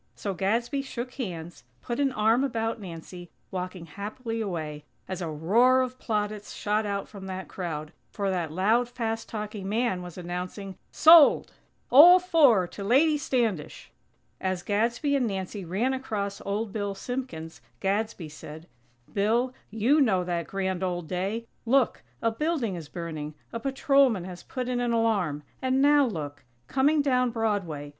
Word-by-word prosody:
So 200 - -3
Gadsby 230 - 0
shook 250 -2 -6
hands, 175 - -6 0.2
put 240 +1 -3
an 275 -1 +2
arm 225 +3 +3
about 225 -4 -2
Nancy, 175 -1 -9 0.2
walking 180 -1 -5
happily 220 +6 -5
away, 155 -7 -4 0.2
as 185 -1 -4
a 170 - -3
roar 225 +12 +4
of 255 0 -3
plaudits 210 -2 -3
shot 210 +1 0
out 200 -1 -2
from 195 -2 -10
that 190 0 -5
crowd, 160 -4 -5 0.2
for 200 -2 -2
that 175 -4 -2
loud, 220 +8 +2
fast 225 -2 -3
talking 210 -3 -5
man 220 -4 0
was 180 -1 -9
announcing: 180 +2 -5
"Sold! 320 -2 +7 0.4
All 330 +8 +10
four 290 - +4
to 200 - -7
Lady 280 +9 +4
Standish!!" 230 - -2 0.5
As 185 -2 -2
Gadsby 235 +7 +1
and 260 -4 +1
Nancy 195 0 -4
ran 200 +10 0
across 205 -6 -3
Old 205 +1 -2
Bill 205 -2 -2
Simpkins, 245 -11 -6 0.2
Gadsby 200 -2 -1
said: 155 +1 -10 0.5
"Bill, 230 +5 +1 0.2
you 235 +8 +3
know 195 -9 +3
that 175 -2 -2
grand 190 -2 -2
old 175 -3 -2
day. 195 +6 -2 0.2
Look! 255 +1 +2 0.2
A 230 - +3
building 285 - -1
is 165 -4 -7
burning! 155 -3 -6 0.2
A 230 - -2
patrolman 270 -4 +3
has 180 -1 -8
put 255 -2 -5
in 250 -1 -1
an 240 -1 0
alarm! 200 -11 +1 0.2
And 260 0 +1
now 285 0 +5
look! 145 -8 -5 0.2
Coming 285 - +3
down 255 -3 +2
Broadway! 200 -11 -2
210 Hz, 155 wpm, -27 LUFS, 180-245 Hz, 0.5 s, All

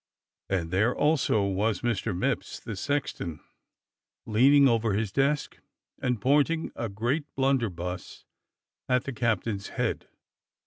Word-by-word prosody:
And 85 -4 -1
there 110 +7 +2
was 150 -1 +2
also 105 - +3
Mr. 105 +1 0
Mipps, - - -2
the 110 - -6
sexton, 100 - -2 0.9
leaning 135 +6 +5
over 115 -3 +2
his 105 0 -1
desk 140 +4 0 0.4
and 125 -3 0
pointing 145 +7 +2
a 115 - -3
great 120 +9 -1
blunderbuss 110 -10 -2 0.6
at 125 -1 +3
the 140 - -5
captain's 110 -3 -1
head. - - -2
115 Hz, 120 wpm, -27 LUFS, 100-135 Hz, 0.9 s, leaning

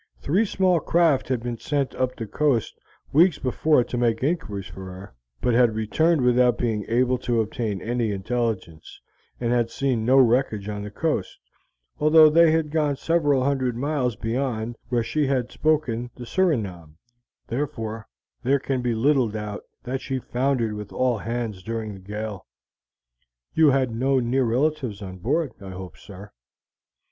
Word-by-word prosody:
Three 190 +10 +1
small 185 -3 +2
craft 160 -5 +2
had 125 -3 -1
been 120 -2 -4
sent 140 -3 -1
up 130 0 -1
the 115 - -5
coast 130 0 0 0.4
weeks 165 +2 +5
before 135 +1 +2
to 120 - -5
make 115 -1 +1
inquiries 130 - -2
for 95 0 -9
her, 95 -4 -10 0.3
but 125 - +1
had 120 -2 +4
returned 155 +9 +2
without 125 0 +4
being 110 -4 -1
able 125 +2 +2
to 120 -2 0
obtain 110 -2 -2
any 120 -2 -1
intelligence, 100 -5 -3 0.4
and 120 -1 -1
had 120 -1 +2
seen 130 -3 -1
no 130 +4 +4
wreckage 120 -5 +3
on 105 -1 -4
the 105 - -6
coast, 150 - -2 0.6
although 155 +1 +7
they 165 +1 +6
had 155 -1 +1
gone 150 -3 +1
several 145 -4 +1
hundred 130 -3 0
miles 135 -3 -1
beyond 115 0 -2
where 120 -2 +1
she 150 +4 0
had 130 -3 0
spoken 130 -7 0
the 125 - -8
Surinam, 105 - -1 0.5
therefore 115 -4 -4 0.3
there 135 +3 +2
can 135 -1 -2
be 120 -2 0
little 130 0 +3
doubt 105 -1 -5 0.2
that 130 +1 -3
she 135 - -3
foundered 125 -3 -1
with 105 -1 -7
all 125 -3 0
hands 115 -3 -4
during 110 +1 -4
the 95 - -10
gale. 105 +1 -6 1.1
You 160 -2 +5
had 130 -3 +1
no 135 +3 +2
near 125 +2 +1
relatives 125 -3 -1
on 95 -1 -8
board, 145 - 0
I 95 - -8
hope, 95 0 -8
sir?" 100 +1 -12
125 Hz, 160 wpm, -24 LUFS, 110-140 Hz, 1.1 s, although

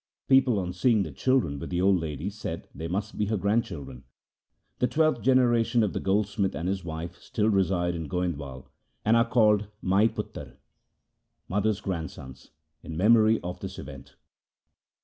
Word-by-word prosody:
People 135 -4 +4
on 90 -2 -2
seeing 110 +3 +2
the 80 - -6
children 85 - +1
with - - -6
the 90 - -1
old 95 0 +4
lady 75 -4 -4
said - - -6
they 80 - -5
must 100 +5 -4
be 105 - +1
her 110 0 0
grandchildren. 85 - -2 0.8
The 125 - +3
twelfth 155 -5 +1
generation 120 -3 +3
of 105 - -1
the - - -2
gold 100 +2 +1
smith 100 -1 -2
and 85 - -3
his 95 0 -2
wife 85 +1 -6
still 110 0 -1
reside 95 -3 +1
in 80 -2 -5
Goindwal, 75 -8 -3 0.4
and 110 +2 +4
are 115 0 +3
called 105 -4 +3 0.2
Maipotre 100 +4 0 0.9
(mother's 105 +2 0
grandsons) 80 -8 -6 0.3
in 80 - -7
memory 110 +3 +5
of 90 +1 -6
this 95 0 -7
event. 70 -1 -10
95 Hz, 160 wpm, -27 LUFS, 85-110 Hz, 0.9 s, memory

